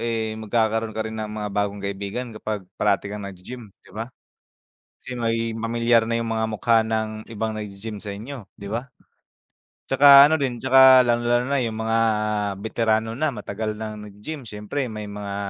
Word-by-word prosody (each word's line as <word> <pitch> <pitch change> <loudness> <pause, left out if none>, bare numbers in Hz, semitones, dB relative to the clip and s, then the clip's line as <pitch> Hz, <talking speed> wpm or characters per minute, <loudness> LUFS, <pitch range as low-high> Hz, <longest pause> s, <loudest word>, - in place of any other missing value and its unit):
eh, 115 -2 -1
magkakaroon 110 0 0
ka 110 - -1
rin 110 0 -5
ng 110 - -4
mga 105 -1 -4
bagong 100 0 -2
kaibigan 100 +5 -4
kapag 110 -2 -5 0.2
parati 100 -1 +1
kang 105 -1 -6
naggi-gym, 105 +5 -10 0.2
di - - -18
ba? 110 +2 -5 0.9
Kasi 125 -1 -7
magiging 115 -1 -1
pamilyar 115 0 +3
na 115 0 0
yung 115 - -3
mga 110 0 0
mukha 115 +2 +3
ng 110 -1 -1 0.2
ibang 110 0 -2
naggi-gym 105 +1 -6
sa 100 -2 -5
inyo, 115 +3 -8
di 100 - -8
ba? 120 +4 -3 1.0
Tsaka 140 +1 +9
ano 160 - +3
din, 130 -5 -2
tsaka 130 0 +8
lalong-lalo 120 0 +2
na 140 - +1
yung 110 -1 -4
mga 115 0 +1 0.6
beterano 110 0 0
na 155 +2 +1
matagal 110 0 -4
ng 110 -1 -5 0.2
naggi-gym, 120 +10 -8
siyempre 105 +6 -4
may 105 -1 -6
mga, 100 -1 -6
110 Hz, 170 wpm, -23 LUFS, 105-120 Hz, 1.0 s, Tsaka